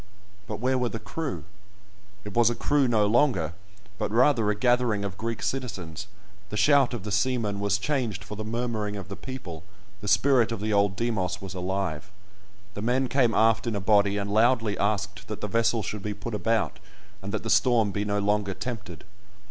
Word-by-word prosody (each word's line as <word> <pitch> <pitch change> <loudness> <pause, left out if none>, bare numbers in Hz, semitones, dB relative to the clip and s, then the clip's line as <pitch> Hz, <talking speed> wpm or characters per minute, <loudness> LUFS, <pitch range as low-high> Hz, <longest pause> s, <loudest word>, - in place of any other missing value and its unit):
But 105 - -5
where 130 +2 +1
were 125 -1 0
the 115 - -4
crew? 135 - -5 0.8
It 105 - -8
was 120 -1 +4
a 120 - -2
crew 145 +1 +2
no 110 -3 +3
longer, 105 - +2 0.5
but - - -1
rather 115 -1 +3
a 105 - +1
gathering 120 -2 +2
of 100 -1 -4
Greek 115 +2 -4
citizens; 100 - -4 0.4
the 105 - -4
shout 140 -1 +4
of 110 - -6
the 105 - -5
seamen 105 -1 0
was 100 0 +1
changed 115 - -2
for 105 - -7
the 110 - -5
murmuring 110 -2 -2
of 100 -1 -7
the 100 - -5
people—the 105 - -10
spirit 125 +1 +4
of 115 - -3
the 105 +1 -1
old 100 -2 +3
Demos 95 -5 -1
was 95 -1 -7
alive. 95 0 -3 0.6
The 100 - -6
men 125 +3 +1
came 120 -3 +2
aft 115 +1 +3
in 115 - -1
a - - -1
body, 100 0 +3
and 100 0 -2
loudly 115 -1 +3
asked 100 -1 -2
that 105 - -5
the 105 - -3
vessel 115 +1 +1
should 105 - -4
be 105 +1 -4
put 110 +3 -6
about, 115 +1 0 0.4
and 100 +1 -6
that 110 - -3
the - - -1
storm 115 -5 +3
be 100 +2 -2
no 105 0 -1
longer 100 -1 0
tempted. 105 -9 -6
105 Hz, 195 wpm, -26 LUFS, 100-120 Hz, 0.8 s, was